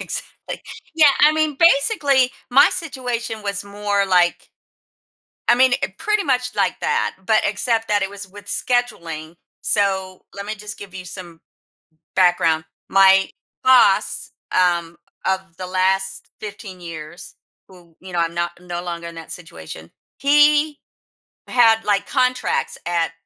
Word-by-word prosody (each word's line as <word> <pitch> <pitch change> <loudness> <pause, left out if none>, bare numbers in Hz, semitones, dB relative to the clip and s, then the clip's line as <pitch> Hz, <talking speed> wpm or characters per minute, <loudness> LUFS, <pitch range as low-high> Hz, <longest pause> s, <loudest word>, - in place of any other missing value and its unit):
Exactly. - - -6 0.3
Yeah, 310 -3 +6
I 300 +1 +7
mean, 310 -2 0
basically, 280 - +4 0.2
my 260 - +7
situation 240 -7 -4
was 200 0 -3
more, 200 0 -1
like, 180 -2 +2 1.0
I - - +6
mean 255 +1 +4
i 195 - -2
pretty 425 -2 0
much 250 -2 0
like - - 0
that, - - 0
but 220 -1 +3
except 225 +2 0
that 205 -1 +2
it 195 - -1
was 200 -1 -8
with 205 +1 -13
scheduling, 175 -10 -2 0.3
so, 190 -2 0
let 200 0 -7
me 215 - -3
just 210 0 -9
give 195 -2 -11
you 185 -1 -7
some 175 -2 -9 0.8
background. 170 -3 +3 0.2
My 195 0 +5 0.3
boss, 250 -7 +4 0.3
um, 170 -2 +1 0.3
of 190 -2 -2
the 185 -1 -6
last 190 +1 -1
15 200 -3 -8
years, 160 0 -9 0.3
who, 175 -3 -19
you 185 -1 -11
know, 175 - 0
I'm 170 0 -1
not 170 0 -1
no 175 -1 -5
longer 170 -1 -5
in 170 - -9
that 165 -1 -10
situation, 80 - -10 0.3
he 295 +1 +4 0.7
had, 225 -3 +4
like, 200 -1 +1
contracts 255 -1 0
at, 170 -1 0
200 Hz, 140 wpm, -21 LUFS, 175-245 Hz, 1.0 s, I